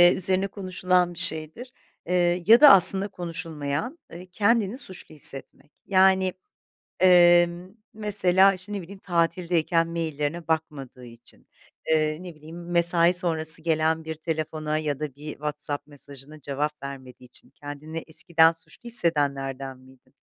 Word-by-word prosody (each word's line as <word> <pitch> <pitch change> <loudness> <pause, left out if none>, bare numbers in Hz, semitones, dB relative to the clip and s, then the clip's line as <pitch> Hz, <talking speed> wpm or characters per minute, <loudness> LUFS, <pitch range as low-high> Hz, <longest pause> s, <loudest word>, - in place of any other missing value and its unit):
üzerine 190 +1 0
konuşulan 185 -2 -1
bir 170 - -10
şeydir. 170 +8 +3 0.4
Iıı, 175 0 0
ya 230 +5 +6
da 295 - +9
aslında 195 0 +8
konuşulmayan; 165 - -6 0.3
kendini 215 +2 0
suçlu 185 - -8
hissetmek. 140 +1 -4
Yani, 190 -1 +2 0.7
ımm, 175 +1 +3 0.2
mesela 195 -2 +2
işte 185 +3 -9
ne 200 -2 -5
bileyim 190 +3 -13
tatildeyken 170 -2 -1
maillerine 165 0 -4
bakmadığı 140 -6 -5
için, 115 0 -16 0.5
ııı, 155 +1 -1
ne 180 -3 -10
bileyim 165 +3 -12
mesai 170 0 +2
sonrası 160 -3 +1
gelen 160 0 -1
bir 160 0 -6
telefona 155 -1 -4
ya 150 -2 -4
da 150 -4 -6
bir 150 +1 -9
WhatsApp 150 -1 -6
mesajına 145 +1 -12
cevap 145 +1 -5
vermediği 130 -2 -10
için 125 - -14
kendini 145 +3 -9
eskiden 165 0 +2
suçlu 165 - -15
hissedenlerden 140 - 0
miydin? 130 0 -22
165 Hz, 125 wpm, -24 LUFS, 150-180 Hz, 0.7 s, da